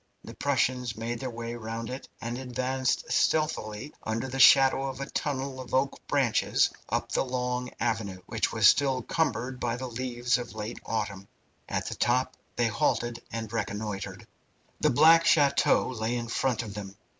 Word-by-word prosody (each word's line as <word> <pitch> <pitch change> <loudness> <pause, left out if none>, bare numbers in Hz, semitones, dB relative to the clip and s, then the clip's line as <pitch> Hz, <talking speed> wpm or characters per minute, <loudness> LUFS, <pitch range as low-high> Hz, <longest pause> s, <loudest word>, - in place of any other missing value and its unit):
The - - -9
Prussians 125 -3 0
made 115 +1 -3
their 130 - -3
way 115 0 -5
round 115 0 -5
it 130 - -7
and 120 +1 -4
advanced 130 0 -1
stealthily, 150 -6 0
under 115 +4 -2
the 135 +1 -5
shadow 135 +1 +7
of 135 0 -6
a 140 - -3
tunnel 135 -2 -3
of 130 - -4
oak 135 +1 +1
branches, - - +2 0.2
up - - -1
the - - +2
long 125 -1 -2
avenue, 110 -5 -1
which 115 +1 -1
was 110 -3 +2
still 130 +2 +5
cumbered 125 -5 -1
by 120 -1 -1
the 130 +2 -5
leaves 120 0 -1
of 120 - -7
last 110 +1 -5
autumn. 105 -3 -3 0.4
At - - -2
the - - -3
top 125 +2 +1 0.2
they 120 - +2
halted 115 +1 0
and 115 -1 -5
reconnoitred. 105 -2 -4 0.5
The 150 - +3
black 165 +5 +6
chateau 145 -4 +4
lay 115 -1 -2
in 120 -1 -3
front 125 0 0
of 105 -3 -7
them. 100 -1 -7
120 Hz, 170 wpm, -28 LUFS, 115-130 Hz, 0.5 s, shadow